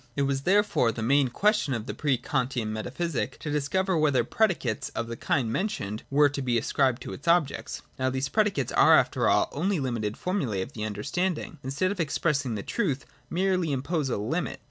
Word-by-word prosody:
It 140 - +1
was 135 0 0
therefore 190 - +3
the 110 0 -5
main 140 +3 +4
question 200 - +1
of 115 -2 -4
the - - -4
pre 140 -4 +1
Kantian 125 -4 -2
metaphysic 130 +5 -3
to 150 - -5
discover 180 +6 0
whether 145 -6 +3
predicates 160 - 0
of 115 - -1
the 115 - -5
kind 120 -1 0
mentioned 115 - -2
were 145 +1 +5
to 140 0 -4
be 125 -3 +1
ascribed 130 +2 +1
to - - -6
its 145 - -11
objects. 170 -4 +1 0.2
Now 130 0 +1
these 130 +1 -1
predicates 200 - +1
are - - +6
after - - +2
all - - +3
only 180 +4 0
limited 115 -6 -2
formulas 140 - -1
of 135 - -11
the 105 -1 -4
under 105 -1 -5
standing 180 - -1
which, - - -17
instead 145 +8 0
of 200 - -5
expressing 145 -5 0
the 100 - -4
truth, 150 - -1 0.2
merely 185 -2 +1
impose 140 +2 -1
a - - -1
limit. 130 +13 -2
140 Hz, 200 wpm, -27 LUFS, 120-170 Hz, 0.2 s, are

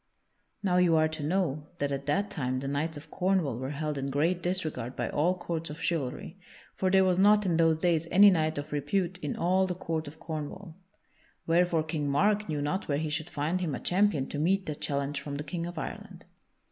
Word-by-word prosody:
Now 180 -2 +2
you 175 -2 +4
are 155 0 +4
to 155 -1 -6
know 155 -2 -1
that 145 0 -1
at 140 0 -4
that 200 +8 0
time 130 -5 -1
the 135 - -4
knights 145 +3 -2
of 145 - -12
Cornwall 180 -10 0
were 130 +1 -3
held 150 0 -3
in 135 0 -2
great 165 +6 +1
disregard 155 -9 -2
by - - -2
all 175 +5 +1
courts 165 -2 -4
of 150 +2 -8
chivalry; 165 +3 -3 0.3
for 190 - 0
there 190 0 +5
was 185 -1 +2
not 210 +1 +5
in 170 -3 +2
those 165 -1 +4
days 165 -1 +1
any 200 +2 +8
knight 155 -3 +1
of 145 +1 -5
repute 175 +5 -1
in 150 -5 -3
all 185 +2 +2
the 180 - -3
court 165 -3 -3
of 155 +2 -10
Cornwall. 160 +3 -6 0.7
Wherefore 170 -1 +3
King 155 -2 -2
Mark 205 +7 +2
knew 150 -2 -1
not 185 +8 -2
where 140 - +1
he 155 0 -2
should 155 +2 -2
find 160 +5 -1
him 160 -6 -1
a - - -5
champion 185 -7 +2
to 145 - -4
meet 190 +5 +2
that 150 -2 -5
challenge 140 0 -1
from 145 -1 -5
the 145 - -4
King 170 +1 -4
of 175 - -8
Ireland. - - -7
160 Hz, 220 wpm, -29 LUFS, 145-180 Hz, 0.7 s, any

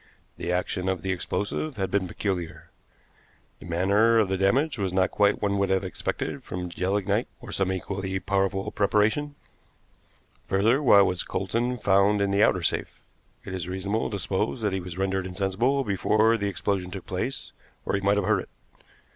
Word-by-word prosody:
The 85 - -3
action 90 +1 -1
of 95 -3 -2
the 95 - -1
explosive 100 - -2
had 95 -2 -2
been 100 -2 +1
peculiar. 85 -4 -4 0.9
The - - -11
manner 100 +7 +3
of 105 -4 +3
the 95 - +1
damage 130 +9 +2
was 95 -2 -1
not 95 0 +2
quite 105 0 +2
what 100 - +2
one 100 - 0
would 100 - +1
have 95 0 +2
expected 95 - -3
from 90 0 -5
gelignite, 95 +3 0
or - - -10
some 95 -1 0
equally 95 +1 -3
powerful 95 0 -1
preparation. 110 +8 +1 1.1
Further, 110 +8 +3
why 105 -8 +7
was 90 -2 0
Coulsdon 120 +2 -1
found 100 -1 +3
in 100 -1 +1
the 100 +1 +2
outer 90 -4 +3
safe? - - -1 0.4
It - - -6
is 90 -2 -4
reasonable 95 +4 -2
to 100 - -3
suppose 100 +5 -2
that 105 -3 0
he 95 - -1
was 90 -1 -8
rendered 95 -1 -1
insensible 100 +9 0
before 110 +2 +2
the 100 -2 -1
explosion 95 -1 -2
took 95 0 -7
place, 95 +9 -4 0.3
or - - -2
he 100 - +1
might 100 +1 +2
have 100 - +1
heard 105 -1 +3
it. - - -12
95 Hz, 180 wpm, -26 LUFS, 95-105 Hz, 1.1 s, why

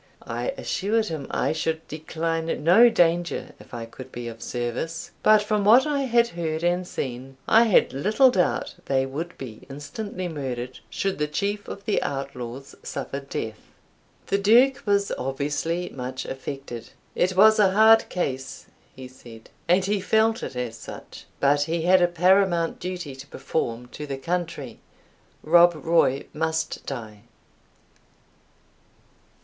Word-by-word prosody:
I - - -4
assured 215 +2 -1
him 155 -4 -5
I - - 0
should 160 0 -2
decline 160 0 -3
no 195 +9 +7
danger 175 -4 +1
if - - -16
I 115 -2 -6
could 130 +3 -11
be 120 0 -6
of 115 -1 -11
service; 125 +7 -4
but 215 -1 +5
from 210 -1 0
what 235 +7 +6
I 295 -2 0
had 235 -1 +3
heard 160 -1 -3
and 175 +1 +1
seen, 130 -1 -5
I 225 +2 +6
had 215 - +3
little 215 - +4
doubt 180 -6 0
they 135 -1 +1
would 155 +6 -6
be 120 -5 -9
instantly 185 - -6
murdered 130 -5 -5
should 195 -3 -2
the 150 - +1
chief 205 +7 -2
of 200 - -8
the 210 - +1
outlaws 135 -1 -5
suffer 140 - -5
death. 110 -5 -5 0.7
The 200 - 0
Duke 240 +6 +5
was 200 0 +2
obviously 145 +6 -2
much 130 0 -6
affected. 135 -3 -7 0.2
"It 185 +1 +1
was 220 +2 +7
a 200 -2 +6
hard 220 +3 +5
case," 135 -7 -4 0.3
he 130 -1 -9
said, 120 -3 -14 0.2
"and 185 +2 +3
he 205 0 0
felt 220 +3 +2
it - - -6
as 125 -2 -4
such; - - -10
but 145 +1 +3
he 165 +1 -2
had 185 +1 +5
a 175 - +5
paramount 175 0 +2
duty 175 -6 -5
to 135 +1 -11
perform 120 -6 -3
to 150 +3 -8
the 135 -1 -4
country 165 -6 -4 0.6
Rob 175 +2 +6
Roy 155 -3 +2
must 160 +1 -2
die!" 110 -6 -6
165 Hz, 150 wpm, -24 LUFS, 135-195 Hz, 0.7 s, no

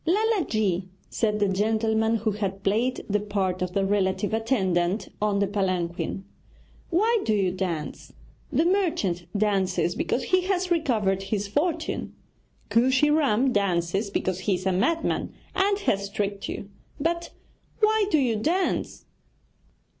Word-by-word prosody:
'Lala 415 +2 +2
ji,' 190 -4 0 0.2
said 210 -2 0
the 205 - +3
gentleman 220 +3 +1
who 220 0 0
had 195 -1 -3
played 230 +6 0
the 210 0 +1
part 195 -3 -2
of 180 -1 -2
the 195 0 +1
relative 195 0 0
attendant 195 -5 +1
on 210 -1 +1
the 200 - +2
palanquin, 185 -2 -2 0.7
'why 440 +7 +3
do 215 - +1
you 190 -3 +1
dance? 180 -5 -4 0.4
The 325 - +2
merchant 315 - 0
dances 190 -4 +1
because 250 - -1
he 370 0 +2
has 370 -1 0
recovered 220 - +1
his 205 -2 -1
fortune; 320 - -2 0.6
Kooshy 260 +5 +4
Ram 270 -4 +3
dances 195 0 0
because 185 -2 -1
he 190 +1 +1
is 180 +1 -6
a 190 - +2
madman 325 - 0 0.2
and 390 +1 +2
has 200 - 0
tricked 200 0 -3
you; 200 - -6 0.3
but 340 +3 -1 0.5
why 430 0 +4
do 315 - +3
you 245 -6 +1
dance?' 345 - -1
210 Hz, 140 wpm, -26 LUFS, 190-295 Hz, 0.7 s, Kooshy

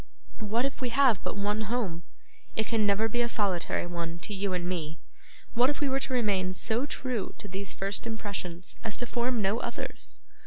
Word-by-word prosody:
What 225 +3 +1
if 275 - -3
we 250 - +1
have 250 -4 +5
but - - -2
one 205 +2 +1
home? 195 -9 -1 0.5
It 220 - +2
can 220 -2 +2
never 205 +2 +4
be 240 +2 +1
a 235 - +2
solitary 195 -6 +1
one 170 -1 -3
to 210 - -1
you 195 0 0
and 180 -1 0
me. 160 -4 -2 0.6
What 245 +2 +5
if 290 - -1
we 290 - +2
were 270 +1 +2
to 270 -1 -2
remain 200 -6 +2
so 230 +8 +2
true 255 -6 -2
to - - -6
these 195 0 -3
first 195 +4 -1
impressions 190 -6 -4
as 220 -2 -1
to 245 - -2
form 240 -1 +1
no 200 +4 +2
others? - - -4
210 Hz, 200 wpm, -30 LUFS, 185-240 Hz, 0.6 s, have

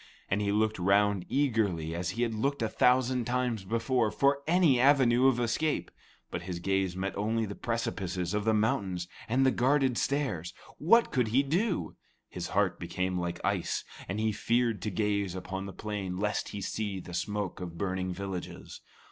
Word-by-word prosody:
And 100 +2 +2
he 100 -1 0
looked 110 0 +1
round 100 0 +2
eagerly, 105 - +1
as 85 +1 -2
he 120 - +2
had 115 -2 0
looked 135 +4 -1
a - - +2
thousand 125 0 +3
times 120 -3 -1
before, 115 +3 +1
for 140 +4 +2
any 165 -7 +4
avenue 130 -2 +5
of 130 -2 +3
escape; 120 +6 0 0.4
but - - -3
his 90 0 -5
gaze 95 0 0
met 95 +1 -3
only 110 +2 0
the 100 - -5
great - - -17
precipices 95 -6 -2
of 105 0 0
the 110 - +2
mountain 100 -4 +1 0.3
and 130 +3 +3
the 130 - +5
guarded 130 -1 +2
stairs. 125 - -1 0.2
What 230 +10 +4
could 125 -4 +1
he 125 +6 +3
do? 175 +7 -1 0.3
His 90 -1 -5
heart 95 -4 +1
became 90 +1 -2
like 85 -1 -3
ice, - - 0 0.2
and 100 +3 -3
he 110 0 +1
feared 115 -1 0
to 105 - -2
gaze 100 -1 -1
upon 95 +1 -5
the - - -6
plain 100 -2 -4
lest 105 +1 -1
he 100 - -6
see 100 0 -3
the 90 - -10
smoke 100 +2 -3
of 85 -2 -6
burning 95 0 -2
villages. 95 -1 -6
105 Hz, 180 wpm, -30 LUFS, 95-125 Hz, 0.4 s, avenue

